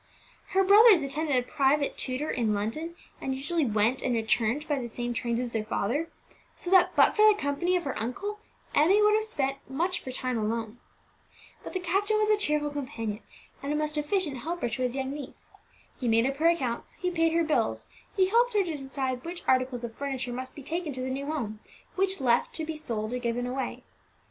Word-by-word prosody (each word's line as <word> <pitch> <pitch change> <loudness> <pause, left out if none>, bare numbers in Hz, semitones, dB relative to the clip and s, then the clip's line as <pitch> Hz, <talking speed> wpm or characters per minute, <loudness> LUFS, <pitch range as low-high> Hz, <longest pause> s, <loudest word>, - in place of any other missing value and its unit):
Her 385 0 +4
brothers 405 -3 +7
attended 290 +1 -1
a 250 - +2
private 280 +1 +2
tutor 260 +4 -2
in 220 -4 +1
London, 305 +12 -3 0.3
and 265 - -2
usually 295 +2 0
went 220 +4 +1
and 245 - 0
returned 230 +5 +1
by 290 -2 0
the 240 - -4
same 240 +1 -4
trains 235 -1 -1
as 245 -1 -2
their 220 -2 -1
father; 245 +9 -1 0.5
so 355 - -5
that, 375 -2 +5
but - - +5
for 425 - +4
the 425 - +6
company 345 +4 0
of 355 - 0
her 275 - -3
uncle, 400 - -4 0.3
Emmie 345 +8 +5
would 420 0 +5
have 435 0 +3
spent 275 -11 -1
much 345 +7 0
of - - -20
her 260 - -4
time 255 -2 -1
alone. 225 +1 -3 0.8
But - - -8
the 370 - -1
captain 395 +4 +1
was 430 0 +2
a - - +6
cheerful 300 -6 0
companion 255 -7 -4 0.4
and 280 +1 -3
a - - +1
most 305 0 -1
efficient 300 -1 0
helper 320 0 -3
to 240 +3 -3
his 250 0 0
young 265 -1 -2
niece. 285 -2 -9 0.5
He 250 - -2
made 230 +1 +4
up 275 +1 -1
her 320 +3 +3
accounts, 260 -9 -2
he 360 -1 -2
paid 330 -1 +2
her 335 0 +3
bills, 310 -1 0 0.3
he 375 -1 +5
helped 475 +2 +3
her 405 - +4
to 335 -4 -3
decide 265 -2 -3
which 345 +1 -7
articles 255 -1 +2
of 235 -1 -5
furniture 265 -2 -4
must 255 +1 -5
be 285 - -9
taken 320 +1 -3
to 255 - -5
the 260 0 -2
new 275 +2 -3
home, 235 -9 -3 0.4
which 385 0 +1
left 245 -3 +2
to 320 - -3
be 320 0 -4
sold 230 -7 -3
or 250 - -1
given 240 0 -1
away. 260 +2 -4
275 Hz, 215 wpm, -28 LUFS, 245-335 Hz, 0.8 s, brothers